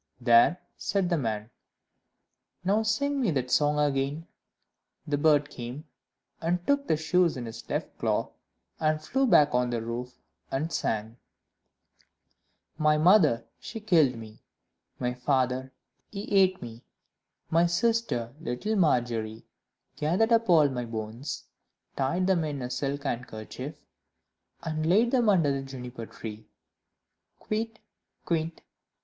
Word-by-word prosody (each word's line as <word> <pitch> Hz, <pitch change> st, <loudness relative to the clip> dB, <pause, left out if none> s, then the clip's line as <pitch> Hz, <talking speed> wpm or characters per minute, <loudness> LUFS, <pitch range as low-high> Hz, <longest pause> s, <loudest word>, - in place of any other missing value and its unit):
"There," 120 Hz, +7 st, +5 dB, 0.2 s
said 195 Hz, -3 st, 0 dB
the 170 Hz, -, +3 dB
man, 110 Hz, -2 st, -3 dB, 1.1 s
"now 200 Hz, +4 st, +2 dB
sing 275 Hz, +6 st, 0 dB
me 235 Hz, -, +2 dB
that 130 Hz, -5 st, -1 dB
song 150 Hz, 0 st, +3 dB
again." 145 Hz, +2 st, 0 dB, 0.8 s
Then -, -, -9 dB
the 145 Hz, -, +2 dB
bird 145 Hz, -1 st, +3 dB
came 125 Hz, +4 st, -7 dB, 0.6 s
and 175 Hz, +2 st, -1 dB
took 280 Hz, 0 st, +1 dB
the 155 Hz, -, +2 dB
shoes 170 Hz, 0 st, +2 dB
in 120 Hz, -, -5 dB
his 115 Hz, 0 st, -9 dB
left -, -, -3 dB
claw -, -, 0 dB, 0.5 s
and 155 Hz, 0 st, +1 dB
flew 265 Hz, +12 st, 0 dB
back 150 Hz, -, +5 dB
on 125 Hz, 0 st, +2 dB
the 120 Hz, -1 st, -1 dB
roof, 120 Hz, +2 st, -5 dB, 0.3 s
and 150 Hz, +5 st, -2 dB
sang 110 Hz, +2 st, -2 dB, 1.6 s
"My 155 Hz, 0 st, +4 dB
mother, 155 Hz, -, +5 dB
she 225 Hz, -, -7 dB
killed 165 Hz, -, +3 dB
me; 110 Hz, -1 st, -11 dB, 0.6 s
My 125 Hz, 0 st, -1 dB
father, 130 Hz, 0 st, 0 dB, 0.4 s
he 200 Hz, -1 st, -6 dB
ate 190 Hz, -4 st, +4 dB
me; 115 Hz, 0 st, -9 dB, 0.7 s
My 165 Hz, +1 st, +4 dB
sister, 175 Hz, -, 0 dB
little 165 Hz, -, -2 dB
Margery, 120 Hz, -, 0 dB, 0.5 s
Gathered 180 Hz, +10 st, +1 dB
up 230 Hz, -2 st, +3 dB
all 160 Hz, -4 st, +6 dB
my 125 Hz, -3 st, -3 dB
bones, 115 Hz, +4 st, -5 dB, 0.5 s
Tied 140 Hz, +7 st, 0 dB
them 185 Hz, -3 st, +2 dB
in 145 Hz, -4 st, -3 dB
a 125 Hz, -, -4 dB
silk 140 Hz, +2 st, -2 dB
handkerchief, 120 Hz, -5 st, -5 dB, 0.9 s
And 155 Hz, -1 st, -2 dB
laid 220 Hz, +7 st, +4 dB
them 245 Hz, -4 st, +3 dB
under 165 Hz, -8 st, +4 dB
the 135 Hz, 0 st, -1 dB
Juniper 125 Hz, -3 st, -8 dB
tree: 110 Hz, -1 st, -9 dB, 0.9 s
Kywitt! 220 Hz, +1 st, -3 dB, 0.5 s
Kywitt! 165 Hz, -1 st, -1 dB
145 Hz, 130 wpm, -28 LUFS, 125-180 Hz, 1.6 s, all